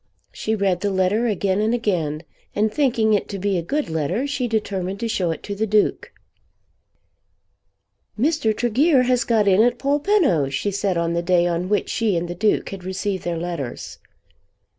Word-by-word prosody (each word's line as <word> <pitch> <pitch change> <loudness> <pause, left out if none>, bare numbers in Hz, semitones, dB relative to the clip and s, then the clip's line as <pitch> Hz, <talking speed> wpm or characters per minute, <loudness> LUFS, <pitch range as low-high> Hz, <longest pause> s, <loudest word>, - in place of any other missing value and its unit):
She 220 - -2
read 195 -4 0
the 205 - 0
letter 195 +5 +1
again 200 -2 0
and 220 +3 +1
again, 170 -9 -1 0.3
and 215 +1 +1
thinking 235 -6 +2
it 205 - 0
to 200 - -4
be 195 -1 0
a - - -2
good 290 - -2
letter 160 - -1
she 280 -3 -2
determined 200 -4 -2
to 230 - -1
show 185 -6 -1
it 160 - -4
to 205 - -4
the 215 +2 -1
Duke. 210 0 +1 2.1
"Mr. 275 -5 +1
Tregear 255 +4 +3
has 250 -1 +2
got 220 -3 +2
in 195 +1 +5
at 240 +1 +3
Polpenno," 285 - +2
she 140 +9 -2
said 195 -2 -1
on 170 0 0
the 170 - 0
day 175 0 +2
on 175 +1 -1
which 210 - +1
she 215 -6 0
and 170 +1 -2
the 175 - -4
Duke 210 +4 0
had 195 -2 -8
received 190 0 -3
their 170 -1 -2
letters. 165 -7 -5
205 Hz, 185 wpm, -22 LUFS, 175-230 Hz, 2.1 s, in